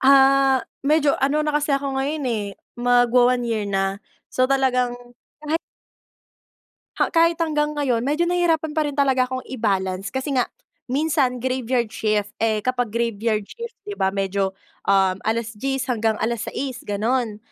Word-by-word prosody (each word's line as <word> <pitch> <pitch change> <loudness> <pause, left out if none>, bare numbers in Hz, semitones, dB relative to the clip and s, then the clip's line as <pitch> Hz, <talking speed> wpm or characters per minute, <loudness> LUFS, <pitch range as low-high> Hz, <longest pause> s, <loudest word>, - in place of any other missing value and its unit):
ah, 270 -1 +5 0.2
medyo 300 -1 +4
ano 290 +3 +2
na 300 - 0
kasi 295 -1 +1
ako 275 -1 -2
ngayon, 290 +2 -2
eh 225 -4 -1 0.3
magwa-one 245 0 +4
year 225 -3 -1
na. 195 0 -1 0.3
So, 255 0 +2
talagang 255 -2 +1 0.5
kahit 310 +2 0 1.4
ha, - - +2
kahit 335 0 +4
hanggang 300 -2 0
ngayon 255 -5 +1
medyo 295 +7 +1
nahihirapan 340 -3 +1
pa 310 - +1
rin 290 - -5
talaga 265 -2 +3
akong 255 0 -4
i-balance 195 -5 -1
kasi 265 +2 -3
nga 250 -2 +1 0.4
minsan 280 -2 +1
graveyard 250 -2 -1
shift 210 -2 0
eh, 220 -2 +1
kapag 245 -2 0
graveyard 225 -1 -1
shift 470 - -9
di 415 - -5
ba 190 - +1
medyo, 195 0 -1 0.3
uhm, 190 -1 +3
10 - - -7
alas-diyes 230 +4 -2
hanggang 220 -2 0
6 - - -3
alas-sais 235 +3 -3
ganon. 220 +2 0
255 Hz, 150 wpm, -22 LUFS, 220-280 Hz, 1.4 s, ah